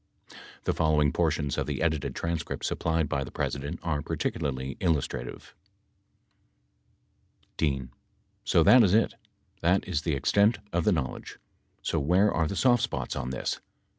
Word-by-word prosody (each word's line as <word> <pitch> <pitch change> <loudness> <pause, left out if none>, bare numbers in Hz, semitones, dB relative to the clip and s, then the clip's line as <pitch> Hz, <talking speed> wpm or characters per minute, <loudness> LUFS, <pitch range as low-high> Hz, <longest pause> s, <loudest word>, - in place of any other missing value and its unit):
The - - 0
following 75 -2 +2
portions 75 -4 0
of - - -2
the 70 -2 -2
edited 80 -4 -1
transcript 85 -1 -3
supplied 80 -2 0
by 70 0 -1
the - - -8
President 70 +1 -3
are 75 -4 -1
particularly 65 -1 -3
illustrative: 75 -8 -2 2.0
D. 70 -4 0 0.6
So 85 - +4
that 125 +9 +8
is 100 -1 +4
it. 115 - +3 0.5
That 90 +4 +2
is 85 -6 -1
the 80 -2 -1
extent 105 - +3 0.2
of 85 -1 +1
the 105 - +4
knowledge. 70 -8 -3 0.5
So 80 - 0
where 90 +8 +3
are 80 -1 +1
the 100 - -4
soft 120 +4 +4
spots 125 - -2
on 65 -2 -3
this 65 - -3
80 Hz, 145 wpm, -28 LUFS, 70-90 Hz, 2.0 s, that